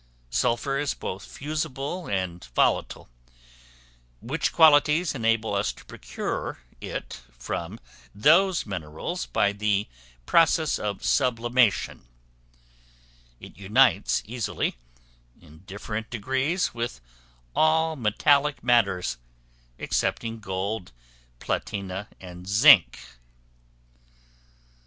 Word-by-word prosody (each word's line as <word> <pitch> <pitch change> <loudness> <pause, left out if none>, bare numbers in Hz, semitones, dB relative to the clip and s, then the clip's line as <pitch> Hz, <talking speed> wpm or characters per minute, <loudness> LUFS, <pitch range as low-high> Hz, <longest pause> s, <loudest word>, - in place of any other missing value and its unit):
Sulphur 135 - 0
is 145 -1 -1
both 95 +1 -6
fusible 155 +3 -4
and 90 -3 -3
volatile, - - +1 1.1
which 145 +7 -2
qualities 155 +1 +5
enable 115 -4 0
us 100 +1 0
to - - -17
procure - - -5 0.2
it - - -6 0.2
from 85 - -5 0.4
those 170 - +4
minerals 80 - -5
by 100 +11 +1
the 105 0 0 0.4
process 160 - +3
of 100 -2 -4
sublimation: 120 - +1 1.3
it - - -12
unites 105 +2 +2
easily, 115 -1 -2 0.7
in 80 +1 -17
different 105 +3 -6
degrees, 130 - -1
with 115 - -4 0.6
all 160 +1 +3
metallic 140 +5 +2
matters, 100 - +2 0.6
excepting 115 0 -2
gold, 95 -1 -4 0.5
platina, 95 +7 -4
and 90 0 -11
zinc. 100 - +6
115 Hz, 85 wpm, -25 LUFS, 95-140 Hz, 1.3 s, zinc